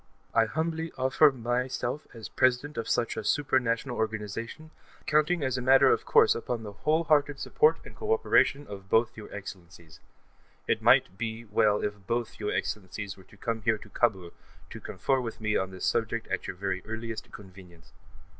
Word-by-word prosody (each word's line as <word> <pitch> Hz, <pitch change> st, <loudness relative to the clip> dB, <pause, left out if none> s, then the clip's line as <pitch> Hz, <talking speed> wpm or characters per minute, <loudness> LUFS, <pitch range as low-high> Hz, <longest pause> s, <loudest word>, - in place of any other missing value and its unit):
I 115 Hz, -, +4 dB
humbly 160 Hz, +5 st, -2 dB
offer 130 Hz, +3 st, +5 dB
myself 125 Hz, +2 st, -2 dB
as 115 Hz, -4 st, -8 dB
President 130 Hz, +7 st, +1 dB
of 115 Hz, -, -4 dB
such 115 Hz, -, 0 dB
a 110 Hz, -, -4 dB
supra 135 Hz, +2 st, +2 dB
national 120 Hz, +1 st, -2 dB
organization, 110 Hz, +7 st, -4 dB, 0.3 s
counting 155 Hz, +2 st, +2 dB
as 130 Hz, -1 st, 0 dB
a -, -, -4 dB
matter 135 Hz, +1 st, +6 dB
of -, -, 0 dB
course -, -, +5 dB
upon 115 Hz, 0 st, -4 dB
the 105 Hz, -, -7 dB
whole 155 Hz, +10 st, +1 dB
hearted 145 Hz, -3 st, +2 dB
support 455 Hz, -, +3 dB
and -, -, -12 dB
co 435 Hz, 0 st, -3 dB
operation 145 Hz, -, +3 dB
of 95 Hz, -3 st, -10 dB
both 110 Hz, +2 st, +2 dB
your 110 Hz, -, -10 dB
Excellencies. 90 Hz, -5 st, -10 dB, 0.7 s
It -, -, +1 dB
might 95 Hz, -, +4 dB
be 115 Hz, 0 st, -4 dB
well 105 Hz, 0 st, +2 dB
if 105 Hz, -2 st, -4 dB
both 120 Hz, -1 st, -2 dB
your 105 Hz, -1 st, -2 dB
Excellencies 100 Hz, 0 st, -4 dB
were 95 Hz, -, -17 dB
to 105 Hz, -, -19 dB
come 115 Hz, +1 st, -3 dB
here 110 Hz, +1 st, +2 dB
to 105 Hz, -, -14 dB
Kabul 95 Hz, -7 st, 0 dB, 0.4 s
to -, -, -7 dB
confer 135 Hz, -1 st, -1 dB
with 115 Hz, -2 st, -6 dB
me 105 Hz, -1 st, 0 dB
on 95 Hz, -, 0 dB
this 95 Hz, -1 st, -5 dB
subject 115 Hz, 0 st, 0 dB
at 95 Hz, -, -2 dB
your -, -, -5 dB
very 95 Hz, 0 st, -3 dB
earliest 110 Hz, 0 st, -6 dB
convenience. 95 Hz, -4 st, -14 dB
115 Hz, 185 wpm, -28 LUFS, 105-130 Hz, 0.7 s, matter